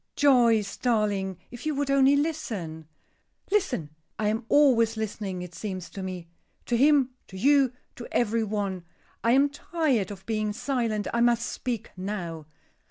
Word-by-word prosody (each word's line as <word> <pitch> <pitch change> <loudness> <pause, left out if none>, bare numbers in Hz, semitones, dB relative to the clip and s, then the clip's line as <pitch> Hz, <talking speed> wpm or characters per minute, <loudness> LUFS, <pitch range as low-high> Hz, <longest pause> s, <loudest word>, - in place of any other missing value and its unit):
"Joyce, 235 -7 +4
darling, 205 -6 0
if 240 0 -9
you 305 - 0
would 280 0 0
only 275 0 +5
listen." 215 - -3 0.6
"Listen! 270 - 0 0.3
I 210 -1 +1
am 225 +2 -2
always 230 -6 +4
listening, 200 -4 -4
it 180 -1 -9
seems 185 -3 -6
to 195 - -7
me. 185 -2 -6 0.4
To 240 - 0
him, 275 0 +4 0.2
to 190 - -10
you, 275 +3 +4 0.3
to 240 - -7
every 230 -1 +1
one. 200 -4 -2 0.4
I 230 - +4
am 275 +2 +5
tired 285 - -1
of 195 -2 -9
being 215 -2 -1
silent; 230 -4 -1
I 235 - +1
must 235 0 +3
speak 235 -3 -4
now. 180 -5 -5
225 Hz, 155 wpm, -27 LUFS, 195-265 Hz, 0.6 s, only